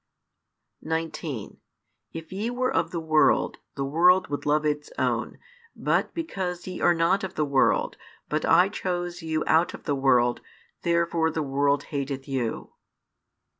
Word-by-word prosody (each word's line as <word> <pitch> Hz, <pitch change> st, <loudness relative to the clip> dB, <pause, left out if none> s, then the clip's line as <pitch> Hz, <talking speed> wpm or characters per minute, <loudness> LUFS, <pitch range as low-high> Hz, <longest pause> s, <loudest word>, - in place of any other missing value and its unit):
19 160 Hz, -7 st, -4 dB, 0.5 s
If 165 Hz, +1 st, -8 dB
ye 210 Hz, +5 st, -2 dB
were 255 Hz, +1 st, -1 dB
of 165 Hz, -, +1 dB
the 170 Hz, -, -3 dB
world, 155 Hz, -1 st, +2 dB, 0.2 s
the 140 Hz, -, -2 dB
world 180 Hz, +6 st, +4 dB
would 145 Hz, 0 st, -4 dB
love 150 Hz, +1 st, +2 dB
its 150 Hz, 0 st, -1 dB
own: -, -, -1 dB, 0.4 s
but -, -, 0 dB
because 190 Hz, -, -4 dB
ye 185 Hz, -, -6 dB
are 175 Hz, -, +4 dB
not 170 Hz, +4 st, +2 dB
of 190 Hz, 0 st, -5 dB
the 155 Hz, -, +1 dB
world, 140 Hz, -2 st, +2 dB, 0.3 s
but 155 Hz, +1 st, -1 dB
I 175 Hz, +3 st, +5 dB
chose 175 Hz, -2 st, -3 dB
you 160 Hz, -1 st, -1 dB
out 160 Hz, +2 st, +3 dB
of -, -, -13 dB
the 145 Hz, -, -1 dB
world, 125 Hz, -3 st, +2 dB, 0.4 s
therefore 170 Hz, -1 st, +1 dB
the 160 Hz, -1 st, -2 dB
world 140 Hz, +1 st, +1 dB
hateth 135 Hz, -1 st, -3 dB
you. 130 Hz, -5 st, -3 dB
160 Hz, 150 wpm, -26 LUFS, 145-175 Hz, 0.5 s, I